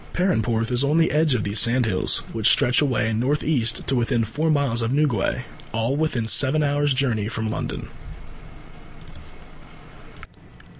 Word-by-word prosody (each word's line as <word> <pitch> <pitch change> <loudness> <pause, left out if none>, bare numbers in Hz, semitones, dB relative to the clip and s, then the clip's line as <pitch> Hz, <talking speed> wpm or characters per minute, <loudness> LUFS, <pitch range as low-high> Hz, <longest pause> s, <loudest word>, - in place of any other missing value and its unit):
Perranporth 115 - 0
is 125 +2 +1
on 145 +3 +1
the 165 - +2
edge 150 -2 +2
of 110 - -1
these 100 +1 0
sandhills, 115 -5 +1
which 110 -1 +2
stretch 125 +4 +3
away 115 -6 0
north 130 +7 -1
east 120 -7 0
to 135 - -1
within 120 -1 0
four 145 +9 -2
miles 140 -6 +1
of 115 +1 -1
Newquay 140 -8 0 0.3
all 115 +4 -1
within 150 -7 -1
seven 140 +6 +3
hours' 145 -1 +1
journey 120 -6 0
from 110 -1 -3
London. - - -5
125 Hz, 145 wpm, -22 LUFS, 115-145 Hz, 0.3 s, stretch